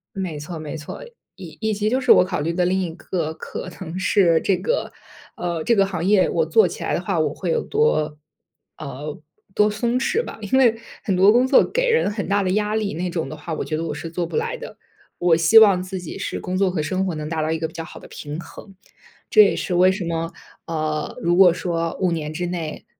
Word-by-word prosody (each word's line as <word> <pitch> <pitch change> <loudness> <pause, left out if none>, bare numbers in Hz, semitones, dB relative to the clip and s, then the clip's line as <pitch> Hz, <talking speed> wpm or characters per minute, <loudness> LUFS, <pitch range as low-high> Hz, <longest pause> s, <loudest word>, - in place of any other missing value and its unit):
没 185 -6 -4
错， 160 +3 -7
没 155 0 -6
错。 155 - -8 0.3
以 180 -4 -10
以 220 -1 0
及 210 +1 0
就 255 +4 +1
是 255 - +6
我 180 - +6
考 180 -4 -3
虑 160 +3 -1
的 180 +1 +1
另 190 +1 +1
一 175 - -3
个 170 -2 -3
可 - - -7
能 175 0 -5
是 175 -4 +3
这 195 - +1
个， - - -2 0.4
呃， 170 -2 -3
这 235 - +3
个 195 -2 +3
行 175 -3 -4
业 195 0 +4
我 480 - +1
做 450 -1 +4
起 - - -8
来 - - -1
的 - - 0
话 - - -2
我 - - +1
会 - - -4
有 475 -1 +1
多 155 - 0 0.6
呃， 145 +1 -7 0.4
多 210 0 +3
松 235 +4 0
弛 425 - 0
吧。 - - -8
因 210 +6 +1
为 235 -4 +4 0.3
很 195 - 0
多 195 +3 +6
工 245 +3 +4
作 - - +5
给 - - 0
人 465 - +2
很 205 -1 -4
大 200 0 +2
的 185 - 0
压 210 +2 0
力 215 -2 -1
那 180 +3 -2
种 165 -5 -3
的 155 - -7
话 160 +2 -5
我 - - -3
觉 155 - -3
得 165 - -3
我 155 - -3
是 165 +3 -7
做 170 0 -2
不 - - -5
来 460 +2 -1
的， - - -10 0.4
我 175 -2 +4
希 170 +7 +6
望 200 -4 +6
自 185 0 -5
己 175 +2 -8
是 195 - -4
工 180 +1 -3
作 190 0 +2
和 175 -4 -2
生 185 +5 -1
活 180 - -2
能 155 -1 -5
达 160 -1 -2
到 155 - -1
一 160 - -1
个 160 - -2
比 - - -15
较 165 -1 -6
好 - - -11
的 - - -13
平 150 +1 -7
衡。 195 +3 -13 0.6
这 215 - +8
也 200 - +2
是 180 - -3
为 185 +1 +5
什 190 -1 -4
么， 165 0 -2 0.4
呃， 155 -2 -3
如 175 +1 +2
果 185 -1 +7
说 170 -2 -2
5 185 -2 +2
年 155 -2 -3
之 175 +3 -3
内， 170 -3 -5
180 Hz, 265 characters per minute, -22 LUFS, 165-210 Hz, 0.6 s, 这